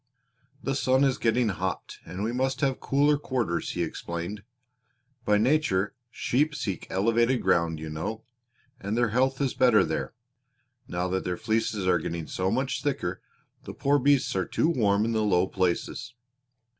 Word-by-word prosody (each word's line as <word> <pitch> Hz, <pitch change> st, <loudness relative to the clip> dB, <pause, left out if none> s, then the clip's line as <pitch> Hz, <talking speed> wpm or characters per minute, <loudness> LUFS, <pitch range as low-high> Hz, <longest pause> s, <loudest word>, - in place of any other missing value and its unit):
"The 135 Hz, -, 0 dB
sun 130 Hz, 0 st, +2 dB
is 135 Hz, -1 st, +2 dB
getting 115 Hz, 0 st, +2 dB
hot 95 Hz, -1 st, -4 dB
and 95 Hz, +3 st, -5 dB
we 110 Hz, -, 0 dB
must 130 Hz, +3 st, -1 dB
have 135 Hz, -3 st, +1 dB
cooler 145 Hz, +1 st, +2 dB
quarters," 120 Hz, -, -2 dB
he -, -, -1 dB
explained. 85 Hz, +5 st, -5 dB, 0.8 s
"By 105 Hz, 0 st, +4 dB
nature 110 Hz, -5 st, +2 dB, 0.2 s
sheep 150 Hz, +6 st, 0 dB
seek 100 Hz, -10 st, -4 dB
elevated 115 Hz, +5 st, +2 dB
ground, 85 Hz, -3 st, +2 dB
you 80 Hz, -, -6 dB
know, 80 Hz, +8 st, -4 dB, 0.6 s
and 105 Hz, -1 st, -3 dB
their 120 Hz, -1 st, +2 dB
health 130 Hz, +4 st, +1 dB
is 135 Hz, -3 st, 0 dB
better 120 Hz, -6 st, +5 dB
there. 80 Hz, +7 st, -3 dB, 0.7 s
Now 90 Hz, +1 st, -2 dB
that 95 Hz, +1 st, -1 dB
their 90 Hz, -1 st, -2 dB
fleeces 110 Hz, -2 st, -1 dB
are 90 Hz, -1 st, +3 dB
getting 80 Hz, 0 st, -4 dB
so 95 Hz, +3 st, -1 dB
much 130 Hz, +5 st, -1 dB
thicker 140 Hz, -, -2 dB, 0.4 s
the -, -, -7 dB
poor 145 Hz, +1 st, +2 dB
beasts 140 Hz, -3 st, +2 dB
are 95 Hz, -2 st, 0 dB
too 160 Hz, -, +1 dB
warm 105 Hz, -8 st, +2 dB
in 115 Hz, -, 0 dB
the 110 Hz, -1 st, +1 dB
low 95 Hz, -4 st, +3 dB
places. 95 Hz, +6 st, -2 dB
110 Hz, 165 wpm, -27 LUFS, 95-130 Hz, 0.8 s, better